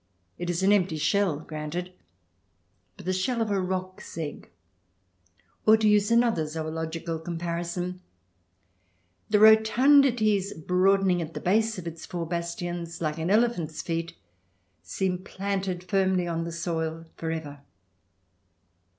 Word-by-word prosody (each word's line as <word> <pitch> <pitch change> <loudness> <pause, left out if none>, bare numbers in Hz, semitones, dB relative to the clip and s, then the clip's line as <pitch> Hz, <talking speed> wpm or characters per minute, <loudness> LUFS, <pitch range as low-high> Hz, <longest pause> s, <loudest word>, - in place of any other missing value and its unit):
It 175 0 -3
is 175 +1 -1
an 195 - +5
empty 185 -5 +2
shell 155 +1 +1
— - - -14
granted 160 +4 -5 0.5
— 90 +1 -44
but - - -12
the 185 - 0
shell 230 +6 0
of 225 -2 0
a 195 -1 +1
roc's 185 -1 -5
egg, 155 -3 -6 1.2
or, 220 +1 +8
to 220 -1 +2
use 210 0 +4
another 230 -9 +3
zoological 160 +1 -4
comparison, 175 +2 -4 1.3
the 210 - +4
rotundities 220 -1 +5
broadening 185 +2 +2
at 165 0 -6
the - - -3
base 220 +3 +1
of 180 - -7
its 165 -1 -7
four 175 -2 -4
bastions, 170 0 -4
like 155 -1 -2
an 160 +2 -1
elephant's 205 -8 +1
feet, 165 0 -3 0.7
seem 180 - -2
planted 190 -1 -3
firmly 190 -1 +1
on 165 -1 -2
the 170 - -5
soil 165 -1 -3
for 165 - -4
ever. 155 -3 -5
175 Hz, 135 wpm, -27 LUFS, 165-195 Hz, 1.3 s, or